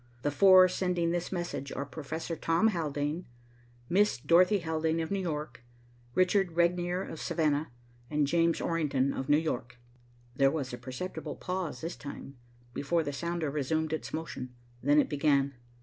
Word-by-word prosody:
The 145 Hz, -, +1 dB
four 185 Hz, +3 st, +7 dB
sending 180 Hz, -2 st, 0 dB
this 175 Hz, 0 st, -2 dB
message 175 Hz, -6 st, -4 dB
are 140 Hz, -, -3 dB
Professor 160 Hz, +3 st, -5 dB
Thomas 170 Hz, +8 st, +2 dB
Haldane 150 Hz, -3 st, -1 dB
and 180 Hz, -, -9 dB, 0.6 s
Miss 205 Hz, +3 st, +3 dB
Dorothy 180 Hz, -, +4 dB
Haldane 160 Hz, -2 st, -1 dB
of 160 Hz, +2 st, -3 dB
New 200 Hz, -, 0 dB
York, 150 Hz, -8 st, -4 dB, 0.5 s
Richard 185 Hz, -1 st, +3 dB
Regnier 175 Hz, +2 st, +1 dB
of 160 Hz, -, -7 dB
Savannah 150 Hz, -3 st, 0 dB, 0.4 s
and 150 Hz, -1 st, +2 dB
James 165 Hz, +2 st, +2 dB
Orrington 140 Hz, -5 st, 0 dB
of 130 Hz, -, -4 dB
New 145 Hz, -, +6 dB
York." 125 Hz, -6 st, -3 dB, 0.6 s
There 135 Hz, +1 st, +4 dB
was 135 Hz, -4 st, -3 dB
a 125 Hz, -, -5 dB
perceptible 135 Hz, +9 st, -6 dB
pause 180 Hz, -3 st, -4 dB
this 165 Hz, +2 st, -4 dB
time, 140 Hz, -1 st, -9 dB, 0.4 s
before 165 Hz, +3 st, 0 dB
the 145 Hz, -, -4 dB
sounder 170 Hz, 0 st, -2 dB
resumed 155 Hz, +2 st, -1 dB
its 160 Hz, -, -4 dB
motion. 130 Hz, -6 st, -5 dB, 0.3 s
Then 145 Hz, +3 st, +4 dB
it -, -, +3 dB
began. 140 Hz, -2 st, +2 dB
160 Hz, 160 wpm, -30 LUFS, 145-175 Hz, 0.6 s, four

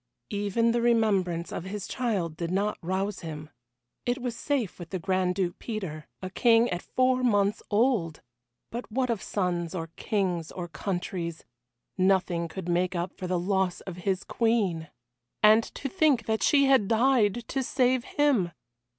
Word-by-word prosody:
Even 205 Hz, +3 st, +1 dB
the 235 Hz, 0 st, +1 dB
remembrance 200 Hz, -8 st, +2 dB
of 170 Hz, -, -5 dB
his 195 Hz, 0 st, -5 dB
child 205 Hz, -11 st, -1 dB
did 170 Hz, 0 st, -3 dB
not 200 Hz, +3 st, 0 dB
rouse 190 Hz, +3 st, -2 dB
him. 155 Hz, -2 st, -7 dB, 0.5 s
It 245 Hz, +2 st, -1 dB
was 245 Hz, -2 st, -3 dB
safe 250 Hz, -8 st, -2 dB
with 170 Hz, -2 st, -8 dB
the 190 Hz, -, -2 dB
Grand 185 Hz, 0 st, 0 dB
Duke 180 Hz, -2 st, -1 dB
Peter 185 Hz, -10 st, -5 dB, 0.2 s
a 185 Hz, -, -4 dB
king 230 Hz, +2 st, +4 dB
at 175 Hz, 0 st, -2 dB
four 255 Hz, 0 st, +1 dB
months 205 Hz, -4 st, +2 dB
old! 205 Hz, -, +1 dB, 0.5 s
But 235 Hz, 0 st, -6 dB
what 250 Hz, +1 st, +1 dB
of 225 Hz, -, -2 dB
sons, 175 Hz, -3 st, -2 dB
or 165 Hz, -2 st, -4 dB
kings 180 Hz, -6 st, -1 dB
or 175 Hz, -2 st, -5 dB
countries 175 Hz, -1 st, -4 dB, 0.5 s
nothing 185 Hz, -3 st, +2 dB
could 175 Hz, +2 st, -7 dB
make 180 Hz, +1 st, +1 dB
up 175 Hz, +2 st, -2 dB
for 185 Hz, -, -5 dB
the 180 Hz, 0 st, 0 dB
loss 190 Hz, 0 st, 0 dB
of 185 Hz, -2 st, -8 dB
his 190 Hz, +1 st, -1 dB
Queen! 200 Hz, -9 st, 0 dB, 0.5 s
And 215 Hz, +2 st, +7 dB
to 275 Hz, -, -3 dB
think 295 Hz, -, +2 dB
that 220 Hz, 0 st, 0 dB
she 280 Hz, -1 st, +5 dB
had 265 Hz, -7 st, +4 dB
died 230 Hz, -1 st, +2 dB
to 270 Hz, -, 0 dB
save 255 Hz, -1 st, +2 dB
him! 260 Hz, -, +1 dB
195 Hz, 165 wpm, -28 LUFS, 175-235 Hz, 0.5 s, And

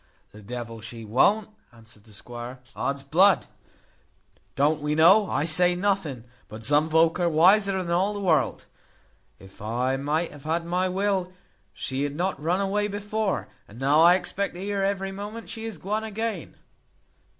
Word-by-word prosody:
"The 105 Hz, -, -13 dB
devil 115 Hz, +1 st, -7 dB
she 115 Hz, 0 st, -8 dB
won't!" 195 Hz, -, +2 dB, 0.2 s
answered 115 Hz, -3 st, -16 dB
the 110 Hz, -, -18 dB
squire. 120 Hz, +4 st, -8 dB, 0.2 s
"Odsbud! 150 Hz, +8 st, +2 dB, 1.1 s
Don't 150 Hz, +3 st, +2 dB
we 150 Hz, +1 st, -1 dB
know 185 Hz, +6 st, +6 dB
I -, -, 0 dB
say 180 Hz, +2 st, +3 dB
nothing, 180 Hz, -, -1 dB, 0.2 s
but 110 Hz, +1 st, -10 dB
some 150 Hz, +5 st, +2 dB
volk 165 Hz, +2 st, +3 dB
are 175 Hz, -1 st, +2 dB
wiser 190 Hz, +4 st, +4 dB
than 170 Hz, -, -5 dB
all 190 Hz, +4 st, +1 dB
the -, -, -4 dB
world. 175 Hz, -6 st, +1 dB, 0.7 s
If 95 Hz, 0 st, -16 dB
I 125 Hz, +5 st, -1 dB
might 150 Hz, +5 st, -1 dB
have 145 Hz, -1 st, -14 dB
had 165 Hz, +2 st, -1 dB
my 180 Hz, +2 st, 0 dB
will, 190 Hz, -1 st, -1 dB, 0.4 s
she 130 Hz, +7 st, -4 dB
had 145 Hz, 0 st, -2 dB
not 180 Hz, -2 st, -2 dB
run 175 Hz, +5 st, 0 dB
away 205 Hz, +1 st, 0 dB
before: 205 Hz, 0 st, -2 dB, 0.2 s
and 105 Hz, -, -14 dB
now 140 Hz, +4 st, +3 dB
I 175 Hz, +2 st, +7 dB
expect 185 Hz, +1 st, -3 dB
to -, -, -8 dB
hear 200 Hz, +1 st, -2 dB
every 195 Hz, 0 st, -1 dB
moment 210 Hz, +3 st, -7 dB
she 225 Hz, 0 st, -6 dB
is 225 Hz, -5 st, -6 dB
guone 210 Hz, +6 st, -3 dB
again. 220 Hz, -4 st, -4 dB
170 Hz, 165 wpm, -25 LUFS, 135-195 Hz, 1.1 s, I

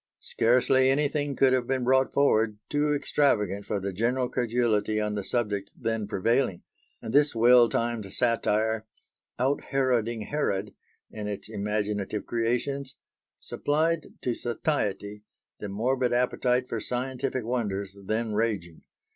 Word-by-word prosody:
Scarcely 130 Hz, +3 st, +3 dB
anything 145 Hz, 0 st, 0 dB
could 130 Hz, 0 st, +4 dB
have 125 Hz, -2 st, +1 dB
been 130 Hz, -1 st, 0 dB
brought 130 Hz, +1 st, +3 dB
forward 110 Hz, -6 st, +2 dB
too 150 Hz, 0 st, +1 dB
extravagant 105 Hz, -9 st, +1 dB
for 105 Hz, -, -1 dB
the 100 Hz, 0 st, -4 dB
general 125 Hz, +5 st, 0 dB
credulity 115 Hz, -3 st, 0 dB
on 105 Hz, 0 st, -1 dB
the 100 Hz, -1 st, -3 dB
subject 105 Hz, -3 st, -2 dB
then 115 Hz, -3 st, -2 dB
prevailing; 110 Hz, 0 st, 0 dB, 0.4 s
and 110 Hz, -, -5 dB
this 145 Hz, -2 st, +4 dB
well 120 Hz, +1 st, +6 dB
timed 115 Hz, -4 st, -2 dB
satire, 110 Hz, -1 st, +1 dB, 0.5 s
"out 135 Hz, +3 st, 0 dB
heroding 120 Hz, -4 st, 0 dB
Herod" 105 Hz, -5 st, -2 dB, 0.4 s
in 105 Hz, -1 st, -5 dB
its 105 Hz, -1 st, -5 dB
imaginative 105 Hz, -1 st, -2 dB
creations, 130 Hz, +4 st, -2 dB, 0.4 s
supplied 155 Hz, +2 st, 0 dB, 0.2 s
to 125 Hz, -, 0 dB
satiety 105 Hz, -5 st, -2 dB, 0.4 s
the 105 Hz, -, -5 dB
morbid 125 Hz, +5 st, 0 dB
appetite 125 Hz, 0 st, +1 dB
for 115 Hz, -, -3 dB
scientific 130 Hz, +2 st, -2 dB
wonders 100 Hz, -5 st, -2 dB
then 110 Hz, +2 st, -1 dB
raging. 105 Hz, -7 st, -2 dB
115 Hz, 130 wpm, -27 LUFS, 105-130 Hz, 0.5 s, well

